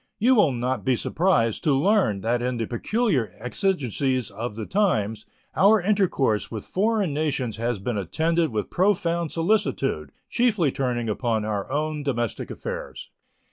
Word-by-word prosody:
You 245 +5 +4
will 205 - +4
not 125 -2 -2
be 130 - +2
surprised 120 - +1
to 145 -3 +3
learn 160 - +2
that 120 +3 0
in 125 0 -1
the 115 - -1
peculiar 130 - 0
exigencies 130 - 0
of 110 +2 -5
the 110 -1 -5
times 110 - 0 0.3
our 210 +3 +5
intercourse 180 - +1
with 110 -3 -6
foreign 205 -4 0
nations 135 -7 -1
has 120 0 -1
been 105 +2 -3
attended 160 - 0
with 110 -3 -3
profound 170 -4 +1
solicitude, 165 - 0 0.2
chiefly 215 - +2
turning 125 -3 -2
upon 110 0 -1
our 105 +2 -3
own 150 +1 -1
domestic 120 -6 -2
affairs. - - -7
135 Hz, 145 wpm, -24 LUFS, 115-185 Hz, 0.3 s, our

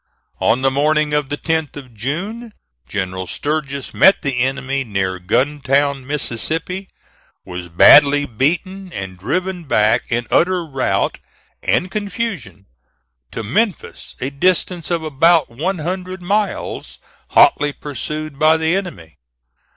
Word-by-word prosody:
On 125 +3 +2
the 135 - +3
morning 150 +2 +1
of 150 -2 0
the 145 - -2
10th 160 -2 -1
of 130 -4 -11
June, 195 - -4 0.4
General 95 -2 -3
Sturgis 140 - -3
met 195 - +5
the 135 -3 -1
enemy 135 +1 -1
near 95 -5 -2
Guntown, 135 +5 0
Mississippi, 160 - -2 0.6
was 90 -1 -7
badly 145 - +7
beaten, 175 - -1
and 95 -1 -6
driven 180 - -2
back 110 -4 +2
in 120 0 -1
utter 180 0 +2
rout 135 -4 -1 0.4
and 185 +1 0
confusion 200 - -4 0.6
to 115 - -5
Memphis, 195 - -2
a 130 +2 -3
distance 175 +3 0
of 170 -2 -1
about 155 -1 +3
one 170 +11 -2
hundred 185 +3 -5
miles, 205 +3 -2 0.3
hotly 150 - +4
pursued 150 +1 -6
by 155 +1 +5
the 160 +2 +1
enemy. 80 - -6
145 Hz, 125 wpm, -18 LUFS, 130-175 Hz, 0.6 s, badly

